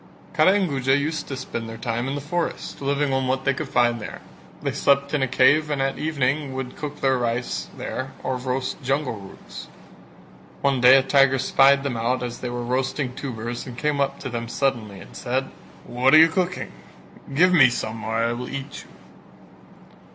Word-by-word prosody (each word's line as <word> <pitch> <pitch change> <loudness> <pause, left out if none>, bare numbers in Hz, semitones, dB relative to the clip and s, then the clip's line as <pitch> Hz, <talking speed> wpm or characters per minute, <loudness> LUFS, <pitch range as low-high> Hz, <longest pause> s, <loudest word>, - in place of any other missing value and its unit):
Kara 170 +5 +5
and 200 -2 +2
Guja 135 -2 +1
used 150 +2 -2
to 135 - -5
spend 115 -3 -5
their 115 - -7
time 115 +2 -2
in 135 - -2
the 145 - -4
forest, 170 +1 -4
living 140 0 0
on 135 -1 0
what 130 +1 -1
they 135 - +3
could 140 +1 -5
find 120 -2 +2
there; - - -7 0.4
they - - 0
slept 140 +1 +1
in 150 - +1
a 135 - +2
cave 145 +5 +4
and 145 -2 -1
at 135 0 -1
evening 140 -2 -1
would 130 -1 -5
cook 150 -1 -7
their 135 -2 +2
rice 120 +1 -2
there 130 0 -5
or 130 - -1
roast 125 +1 -3
jungle 135 0 -1
roots. 100 -3 -11 0.9
One 135 -2 +1
day 125 +2 +8
a 135 - +5
tiger 135 -1 +4
spied 135 +1 +4
them 135 -4 -2
out 125 +3 0
as 120 -1 -5
they 125 - -4
were 120 0 -4
roasting 130 +1 -1
tubers 120 -2 -5
and 120 -2 -8
came 145 +1 0
up 140 - 0
to 130 - -4
them 115 -1 -4
suddenly 115 -6 -2
and - - -13
said. 130 +2 -2 0.3
"What 130 +4 +3
are - - +10
you 160 +1 +8
cooking? 180 +2 -2 0.6
Give 180 +5 +5
me 135 -7 +7
some 110 -2 -4
or 110 0 -3
I 115 +1 +1
will 125 +1 -6
eat 140 0 -7
you." - - -20
135 Hz, 200 wpm, -23 LUFS, 120-140 Hz, 0.9 s, are